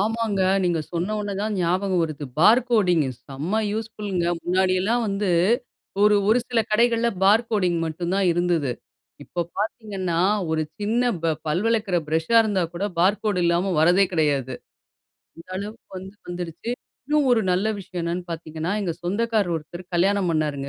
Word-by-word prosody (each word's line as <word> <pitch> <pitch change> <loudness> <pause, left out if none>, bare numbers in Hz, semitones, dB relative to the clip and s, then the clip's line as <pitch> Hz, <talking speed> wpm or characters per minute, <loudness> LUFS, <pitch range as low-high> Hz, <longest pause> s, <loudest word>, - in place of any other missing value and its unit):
ஆமாங்க. 220 -1 0 0.2
நீங்க 170 -2 +1
சொன்னோன 205 +3 -2
தான் 215 -1 -1
ஞாபகம் 180 +1 +1
வருது. 155 -3 -4
பார் 215 +9 +6
கோடிங்கு 180 - +3 0.2
செம 160 +11 -2
யூஸ்ஃபுல்ங்க 210 -5 -3 0.2
முன்னாடி 185 +1 +2
எல்லாம் 235 +5 +1
வந்து. 200 -1 -1 0.7
ஒரு 210 0 +6
ஒரு 225 - +5
சில 240 -2 +2
கடைகள்ல 235 +1 +3
பார் 215 +4 +5
கோடிங் 180 -6 +1
மட்டும் 170 +3 -3
தான் 195 -1 +2
இருந்தது. 170 -6 0 0.5
இப்போ 175 - -4 0.2
பார்த்தீங்கன்னா, 200 -5 -2 0.3
ஒரு 160 0 +1 0.2
சின்ன 220 +4 +1 0.2
ப 165 -1 +2
பல் 160 +6 0
வளர்க்குற 220 -5 +1
பிரஷா 160 +8 +1
இருந்தா 205 -4 0
கூட 185 +4 -2
பார் 195 +4 +3
கோடு 205 -4 0
இல்லாம 170 +3 +1
வரதே 180 +5 +5
கெடையாது. 140 -6 0 0.8
அந்த 165 - -13
அளவுக்கு 210 +3 -7
வந்து 190 +2 -10
வந்துடுச்சு. 175 +4 -5 0.4
இன்னும் 295 -1 +2
ஒரு 235 -2 +4
நல்ல 185 +4 +1
விஷயம் 185 -2 -6
என்னன்னு 175 +1 -2
பாத்தீங்கன்னா 160 0 -4
எங்க 180 -4 -1
சொந்தக்காரு 210 +2 0
ஒருத்தர் 165 +3 -6
கல்யாணம் 190 +2 +2
பண்ணாருங்க 150 -3 -1
185 Hz, 150 wpm, -23 LUFS, 170-210 Hz, 0.8 s, பார்